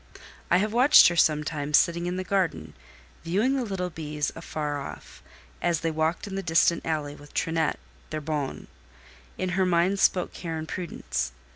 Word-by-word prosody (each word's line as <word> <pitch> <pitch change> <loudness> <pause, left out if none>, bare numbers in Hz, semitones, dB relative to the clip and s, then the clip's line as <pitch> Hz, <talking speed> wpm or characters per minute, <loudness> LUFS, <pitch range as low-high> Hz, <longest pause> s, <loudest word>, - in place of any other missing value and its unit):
I 180 - +5
have 210 +3 0
watched 255 0 +7
her 175 - -3
sometimes 150 -2 +2
sitting 170 0 +1
in 180 +1 -2
the 185 - -2
garden, 170 - -1 0.5
viewing 205 +11 +1
the 265 - 0
little 190 -5 -3
bees 150 -2 -3
afar 150 -3 -4
off, - - -10 0.4
as 170 -3 +1
they 165 - 0
walked 160 +2 -1
in 200 -1 -6
a 195 - -2
distant 170 -1 +2
alley 150 -3 -2
with 145 0 -15
Trinette, 160 -1 0 0.3
their 155 - -3
bonne; 150 -2 -3 0.7
in 185 - -2
her 190 +1 +1
mien 180 +3 +2
spoke 185 -2 +2
care 165 -2 -5
and 160 0 -5
prudence. 160 - -4
165 Hz, 170 wpm, -26 LUFS, 150-185 Hz, 0.7 s, watched